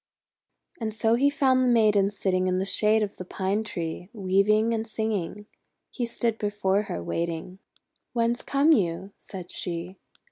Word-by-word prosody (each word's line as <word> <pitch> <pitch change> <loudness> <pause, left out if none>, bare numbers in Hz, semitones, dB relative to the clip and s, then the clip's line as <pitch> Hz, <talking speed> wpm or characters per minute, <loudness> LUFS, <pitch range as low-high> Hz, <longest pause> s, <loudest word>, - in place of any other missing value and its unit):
And 220 -2 -3
so 225 +1 +2
he 270 +4 +4
found 260 -2 +3
the - - +2
Maiden 210 -4 +4
sitting 185 -2 0
in 185 0 +1
the 190 - 0
shade 215 +2 +3
of 205 - -5
the - - -5
Pine 190 +4 -1
Tree, 175 -3 -5
weaving 215 +2 +2
and 225 0 -2
singing. 210 -3 -3 0.5
He 240 -2 -3
stood 230 -1 -1
before 205 -1 +1
her, 85 - -4
waiting. 170 - -3 0.5
'Whence 235 0 +1
come 280 +3 +3
you?" 190 - +1
said 180 -3 -9
she. 175 +2 -4
205 Hz, 155 wpm, -26 LUFS, 185-225 Hz, 0.5 s, he